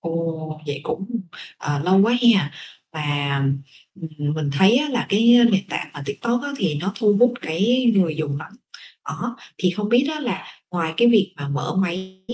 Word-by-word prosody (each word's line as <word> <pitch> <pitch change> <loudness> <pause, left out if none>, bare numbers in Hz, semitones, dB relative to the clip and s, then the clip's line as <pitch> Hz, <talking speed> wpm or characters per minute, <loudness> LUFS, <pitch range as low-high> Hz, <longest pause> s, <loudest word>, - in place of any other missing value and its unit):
Ồ, 165 -2 -4
vậy 145 -1 -4
cũng, 195 - -4 0.5
ờ, 145 -1 -2
lâu 190 +2 +4
quá 230 +3 +3 0.2
ha, 155 -7 0 0.4
và, 145 -2 -1 0.6
ừm, 155 -2 -4
mình 150 -2 -2
thấy 190 - +5
á 295 +2 +1
là 245 -3 -1
cái 225 +4 +4 0.2
nền 195 0 +1
tảng - - -4
mà 145 - -7
TikTok 235 +12 -1
á 285 - -4
thì 175 - 0
nó 185 +7 -2
thu 210 -3 +3
hút 245 0 +5
cái 220 +11 +1
người 170 -6 +2
dùng 150 -3 -2
lắm. 200 - -11 0.5
Đó, 240 0 -5 0.2
thì 180 -1 +2
không 205 +3 -3
biết 245 +4 +4
á 305 - -5
là 195 -8 -4 0.2
ngoài 165 -2 -2
cái 240 0 +5
việc 205 -5 +4
mà 140 -1 -6
mở 145 +5 -3
máy, 190 0 -2
185 Hz, 190 wpm, -22 LUFS, 155-215 Hz, 0.6 s, thấy